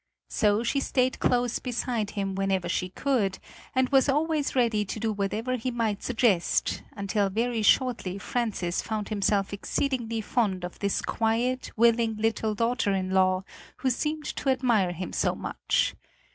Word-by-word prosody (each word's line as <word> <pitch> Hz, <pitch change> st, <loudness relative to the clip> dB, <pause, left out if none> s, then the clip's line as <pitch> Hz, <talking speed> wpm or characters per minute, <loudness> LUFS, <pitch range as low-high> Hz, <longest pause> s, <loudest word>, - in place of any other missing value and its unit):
So 210 Hz, +2 st, +2 dB
she 275 Hz, +4 st, +1 dB
stayed 260 Hz, -1 st, 0 dB
close 245 Hz, -1 st, +1 dB
beside 240 Hz, -3 st, -2 dB
him 195 Hz, -1 st, -1 dB
whenever 190 Hz, -2 st, 0 dB
she 180 Hz, +1 st, -1 dB
could, 210 Hz, -2 st, 0 dB, 0.4 s
and 260 Hz, 0 st, +3 dB
was 270 Hz, 0 st, +4 dB
always 300 Hz, 0 st, +1 dB
ready 230 Hz, -4 st, +2 dB
to 205 Hz, +2 st, -5 dB
do 220 Hz, +1 st, 0 dB
whatever 215 Hz, +5 st, -1 dB
he 250 Hz, +2 st, -2 dB
might 225 Hz, -4 st, -1 dB
suggest, 220 Hz, -7 st, +1 dB
until 200 Hz, 0 st, 0 dB
very 230 Hz, +3 st, 0 dB
shortly 215 Hz, -4 st, +2 dB
Francis 200 Hz, -6 st, -2 dB
found 215 Hz, -2 st, -3 dB
himself 200 Hz, -2 st, +1 dB
exceedingly 230 Hz, +1 st, -1 dB
fond 205 Hz, -5 st, 0 dB
of 180 Hz, -, -6 dB
this 200 Hz, -1 st, 0 dB
quiet, 235 Hz, +3 st, 0 dB
willing 230 Hz, -1 st, +3 dB
little 220 Hz, 0 st, 0 dB
daughter 230 Hz, -2 st, +1 dB
in 185 Hz, -1 st, -1 dB
law 185 Hz, 0 st, +3 dB, 0.3 s
who 260 Hz, 0 st, +1 dB
seemed 300 Hz, +4 st, -2 dB
to 275 Hz, -, -1 dB
admire 240 Hz, -8 st, +2 dB
him 175 Hz, 0 st, -6 dB
so -, -, +1 dB
much. -, -, 0 dB
225 Hz, 155 wpm, -27 LUFS, 200-250 Hz, 0.4 s, was